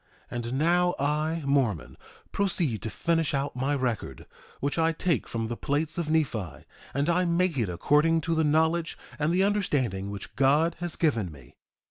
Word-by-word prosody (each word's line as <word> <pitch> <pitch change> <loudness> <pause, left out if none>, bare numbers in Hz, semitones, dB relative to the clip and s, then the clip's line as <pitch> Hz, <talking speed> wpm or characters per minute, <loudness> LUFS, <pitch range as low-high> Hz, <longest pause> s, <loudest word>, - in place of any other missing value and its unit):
1:9 - - -6
And 120 - -4
now 175 +4 +2
I, 155 +3 0
Mormon, 105 - 0 0.4
proceed 170 - 0
to 110 - -3
finish 165 +2 0
out 140 0 -2
my 135 +3 0
record, 120 - -3 0.3
which 145 +4 -1
I 165 0 +3
take 165 -3 0
from 115 -1 -3
the 120 - -3
plates 145 +6 -1
of 160 -3 -2
Nephi; 115 - -1 0.3
and 140 +2 +1
I 175 +2 +3
make 170 0 +1
it 110 -5 0
according 150 - +2
to 165 - -1
the 160 0 +2
knowledge 160 +2 +1 0.2
and 150 +2 +1
the 185 +2 +3
understanding 135 - 0
which 100 -1 -8
God 145 +6 +3
has 175 -2 -2
given 115 - 0
me. 65 -5 -15
150 Hz, 175 wpm, -27 LUFS, 120-165 Hz, 0.4 s, I